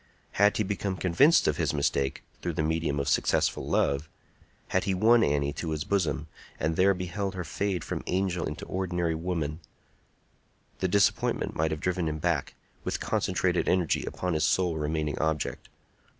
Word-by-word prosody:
Had 105 Hz, +1 st, +3 dB
he 110 Hz, -, +2 dB
become 100 Hz, -1 st, -2 dB
convinced 130 Hz, -, +4 dB
of 75 Hz, -, +1 dB
his 80 Hz, -3 st, 0 dB
mistake 70 Hz, -1 st, 0 dB, 0.2 s
through 85 Hz, -, -2 dB
the 80 Hz, -, 0 dB
medium 80 Hz, -2 st, 0 dB
of 70 Hz, -, -2 dB
successful 75 Hz, -, +1 dB
love,—had 75 Hz, +5 st, -2 dB
he 95 Hz, -, +1 dB
won 115 Hz, +4 st, +5 dB
Annie 70 Hz, 0 st, +1 dB
to 85 Hz, -, -4 dB
his 80 Hz, -1 st, -2 dB
bosom, 95 Hz, -6 st, 0 dB, 0.3 s
and 80 Hz, +1 st, 0 dB
there 95 Hz, +2 st, +4 dB
beheld 95 Hz, +2 st, -3 dB
her 90 Hz, -, -3 dB
fade 95 Hz, -1 st, -2 dB
from -, -, -4 dB
angel 90 Hz, -2 st, 0 dB
into 75 Hz, -, -6 dB
ordinary 90 Hz, -3 st, -1 dB
woman,—the 80 Hz, +2 st, -7 dB
disappointment 100 Hz, +2 st, +1 dB
might 80 Hz, 0 st, +1 dB
have 80 Hz, 0 st, -3 dB
driven 90 Hz, -2 st, 0 dB
him 75 Hz, -, -3 dB
back, 80 Hz, -3 st, -1 dB, 0.3 s
with -, -, -2 dB
concentrated 90 Hz, -1 st, 0 dB
energy, 90 Hz, -4 st, +2 dB
upon 90 Hz, -1 st, -3 dB
his 80 Hz, -, +1 dB
sole 90 Hz, -3 st, +2 dB
remaining 75 Hz, -1 st, -2 dB
object. 80 Hz, -1 st, -2 dB
85 Hz, 160 wpm, -28 LUFS, 75-95 Hz, 0.3 s, won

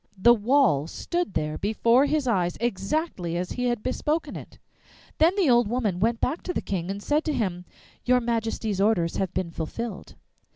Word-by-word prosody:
The 235 Hz, +6 st, +6 dB
wall 225 Hz, -, +2 dB
stood 345 Hz, -, -3 dB
there 155 Hz, 0 st, -2 dB
before 230 Hz, +6 st, +3 dB
his 295 Hz, -2 st, 0 dB
eyes, 180 Hz, -7 st, +1 dB
exactly 195 Hz, -, -2 dB
as 180 Hz, +1 st, -3 dB
he 250 Hz, -, -2 dB
had 240 Hz, -3 st, -1 dB
bespoken 300 Hz, +5 st, -1 dB
it! -, -, -10 dB, 0.6 s
Then 330 Hz, +3 st, +5 dB
the 380 Hz, -6 st, +3 dB
old 240 Hz, -2 st, +4 dB
woman 215 Hz, -6 st, -1 dB
went 230 Hz, +3 st, +1 dB
back 320 Hz, -, -1 dB
to 360 Hz, -, -4 dB
the -, -, +1 dB
King 180 Hz, -2 st, -3 dB
and 200 Hz, +1 st, -4 dB
said 300 Hz, +2 st, +1 dB
to 310 Hz, -, 0 dB
him, 185 Hz, -8 st, -2 dB, 0.4 s
'Your 250 Hz, 0 st, +4 dB
Majesty's 225 Hz, -4 st, -2 dB
orders 180 Hz, -6 st, +2 dB
have 190 Hz, -2 st, -1 dB
been 170 Hz, -3 st, -2 dB
fulfilled. 190 Hz, +6 st, -6 dB
225 Hz, 180 wpm, -25 LUFS, 185-255 Hz, 0.6 s, The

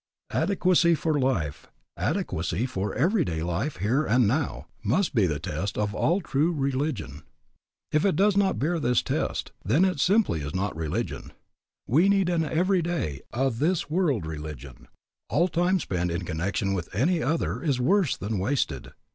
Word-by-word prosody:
Adequacy 180 Hz, -3 st, +3 dB
for 155 Hz, -1 st, 0 dB
life, 85 Hz, -, -1 dB, 0.3 s
adequacy 90 Hz, +8 st, -1 dB
for 100 Hz, -5 st, -3 dB
everyday 150 Hz, -, +1 dB
life 90 Hz, -, -2 dB
here 115 Hz, -, +1 dB
and 125 Hz, -3 st, +3 dB
now, 115 Hz, -, -1 dB, 0.2 s
must 135 Hz, -, +1 dB
be 110 Hz, -7 st, +3 dB
the 75 Hz, -3 st, -1 dB
test 95 Hz, +6 st, -4 dB
of 105 Hz, -1 st, -1 dB
all 170 Hz, -, +1 dB
true 155 Hz, +1 st, +1 dB
religion. 135 Hz, -, -2 dB, 0.7 s
If 155 Hz, -, +2 dB
it 195 Hz, -, +2 dB
does 200 Hz, +1 st, +3 dB
not 200 Hz, -1 st, +2 dB
bear 165 Hz, +5 st, 0 dB
this 125 Hz, -4 st, +2 dB
test, -, -, -2 dB
then 170 Hz, +7 st, +3 dB
it 185 Hz, -6 st, 0 dB
simply 195 Hz, -, +2 dB
is 75 Hz, +3 st, -5 dB
not 95 Hz, 0 st, -1 dB
religion. 80 Hz, -2 st, -4 dB, 0.5 s
We 165 Hz, -, +3 dB
need 195 Hz, -3 st, +3 dB
an 170 Hz, -2 st, +1 dB
everyday, 170 Hz, -, 0 dB
a 135 Hz, +3 st, +1 dB
this 155 Hz, +7 st, -1 dB
world 150 Hz, -, +1 dB
religion. 75 Hz, -5 st, -8 dB, 0.4 s
All 170 Hz, +5 st, +3 dB
time 180 Hz, +2 st, +1 dB
spent 90 Hz, -, -2 dB
in 85 Hz, +1 st, -3 dB
connection 90 Hz, +4 st, -1 dB
with 90 Hz, -3 st, -3 dB
any 160 Hz, -, +2 dB
other 160 Hz, +3 st, -1 dB
is 140 Hz, -7 st, 0 dB
worse 180 Hz, +4 st, +2 dB
than 105 Hz, 0 st, -3 dB
wasted. 125 Hz, +9 st, -1 dB
135 Hz, 160 wpm, -26 LUFS, -, 0.7 s, Adequacy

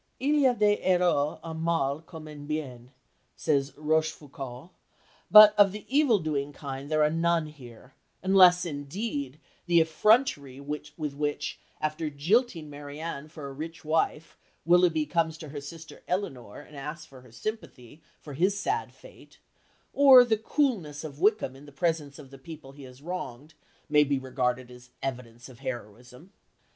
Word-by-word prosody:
"Il 280 Hz, +3 st, +1 dB
y 270 Hz, -, +5 dB
a 245 Hz, -, 0 dB
des 210 Hz, -2 st, +2 dB
héros 175 Hz, -5 st, +2 dB
en 160 Hz, -1 st, -6 dB
mal 155 Hz, -3 st, 0 dB
comme 160 Hz, -1 st, -11 dB
en 145 Hz, -1 st, -10 dB
bien," 130 Hz, -6 st, -5 dB, 0.5 s
says 140 Hz, -2 st, 0 dB
Rochefoucauld, 150 Hz, -2 st, -3 dB, 0.6 s
but 215 Hz, 0 st, +10 dB
of 200 Hz, -2 st, +7 dB
the 210 Hz, +1 st, -8 dB
evil 285 Hz, -7 st, +5 dB
doing 145 Hz, -4 st, -2 dB
kind 140 Hz, -1 st, -7 dB
there 155 Hz, -1 st, +2 dB
are 150 Hz, -, +3 dB
none 165 Hz, 0 st, +1 dB
here, 130 Hz, -4 st, -13 dB, 0.3 s
unless, 185 Hz, -2 st, +6 dB
indeed, 145 Hz, -, -5 dB, 0.3 s
the 170 Hz, -1 st, +5 dB
effrontery 160 Hz, -, +2 dB
with 150 Hz, +1 st, -6 dB
which, 145 Hz, -1 st, -3 dB, 0.2 s
after 155 Hz, +1 st, -2 dB
jilting 165 Hz, -, 0 dB
Marianne 145 Hz, +1 st, -7 dB
for 155 Hz, -2 st, -10 dB
a 135 Hz, -, -8 dB
rich 160 Hz, +3 st, -8 dB
wife, 160 Hz, 0 st, -1 dB, 0.3 s
Willoughby 170 Hz, -2 st, +4 dB
comes 160 Hz, 0 st, 0 dB
to 155 Hz, -2 st, -9 dB
her 145 Hz, 0 st, -7 dB
sister 160 Hz, +3 st, -11 dB
Elinor 130 Hz, -, -4 dB
and 150 Hz, -, -16 dB
asks 150 Hz, +3 st, -7 dB
for 135 Hz, -4 st, -15 dB
her 125 Hz, -2 st, -18 dB
sympathy 150 Hz, -, -7 dB, 0.2 s
for 145 Hz, -, -10 dB
his 190 Hz, +7 st, +1 dB
sad 440 Hz, -, -2 dB
fate, -, -, -17 dB, 0.6 s
or 265 Hz, -3 st, +8 dB
the 225 Hz, -2 st, +2 dB
coolness 215 Hz, -, -1 dB
of 150 Hz, -2 st, -8 dB
Wickham 205 Hz, -8 st, +2 dB
in 140 Hz, +2 st, -14 dB
the -, -, -12 dB
presence 150 Hz, -1 st, -2 dB
of 135 Hz, -3 st, -13 dB
the 135 Hz, -, -12 dB
people 140 Hz, -1 st, -11 dB
he 140 Hz, 0 st, -12 dB
has 130 Hz, +2 st, -15 dB
wronged 160 Hz, -4 st, -6 dB, 0.3 s
may 150 Hz, -1 st, +5 dB
be 140 Hz, -1 st, 0 dB
regarded 130 Hz, -1 st, -2 dB
as 125 Hz, 0 st, -15 dB
evidence 120 Hz, -3 st, -6 dB
of 130 Hz, -2 st, -15 dB
heroism. 125 Hz, -, -8 dB
150 Hz, 160 wpm, -27 LUFS, 140-170 Hz, 0.6 s, but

